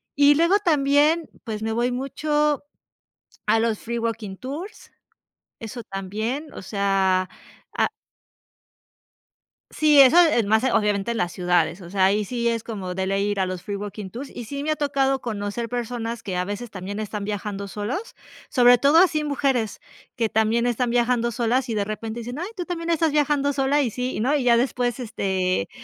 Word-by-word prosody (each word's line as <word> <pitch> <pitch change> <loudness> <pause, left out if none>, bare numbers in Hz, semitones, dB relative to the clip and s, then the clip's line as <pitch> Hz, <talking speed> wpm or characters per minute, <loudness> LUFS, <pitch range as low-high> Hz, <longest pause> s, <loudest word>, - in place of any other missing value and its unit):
Y 285 0 +6
luego 340 +6 +4
también, 300 -1 +2
pues, 220 -3 -5
me 225 - -1
voy 240 +2 0
mucho 295 +3 0 0.8
a 225 - +4
los 225 -2 0
free 235 +1 -4
walking 220 -4 -3
tours, 310 +11 -8 0.7
eso 230 +1 -7
también, 215 +11 -4
o - - -8
sea, 190 -2 +1 0.5
a - - +2 1.8
Sí, 300 -2 +5
eso 270 +5 +7
es 270 -11 +4
más, 220 +2 +3
obviamente, 210 -4 +1
en 235 - -1
las 175 -4 -1
ciudades, 175 -1 +1
o 175 -1 -10
sea, 190 -1 +2
ahí 205 +2 +3
sí 235 +2 -3
es 230 -1 -1
como 190 -5 -5
de 190 0 -2
ley 195 +1 0
ir 200 -1 -1
a 190 - +2
los 185 -1 -5
free 205 - -4
walking 205 -1 -6
tours, 270 +4 -7
y 240 - -7
sí 280 +4 -5
me 310 - -1
ha 310 - +1
tocado 270 -2 +1
conocer 220 +1 -4
personas 235 -1 -4
que 185 -3 -4
a 180 - 0
veces 205 +4 -5
también 200 +2 -6
están 210 -1 -4
viajando 205 -1 -4
solos, 215 - -5 0.3
sobre 245 -2 +6
todo 290 +4 +5
así 310 -4 +4
mujeres 270 -6 0 0.3
que 230 -3 0
también 220 +2 +1
están 245 0 0
viajando 240 -1 +1
solas 245 +2 0
y 225 - -2
de 205 -1 0
repente 220 +2 -5
dicen: 245 +5 -6
"Ay, 350 - -3
tú 355 - -3
también 340 -1 -4
estás 325 -1 +2
viajando 290 -1 +2
sola" 275 +2 +2
y 240 - 0
sí, 250 -1 -3
¿no? 280 +6 +2
Y 265 - -1
ya 235 -1 +5
después, 245 0 0
este, 190 - -1
235 Hz, 185 wpm, -23 LUFS, 205-275 Hz, 1.8 s, eso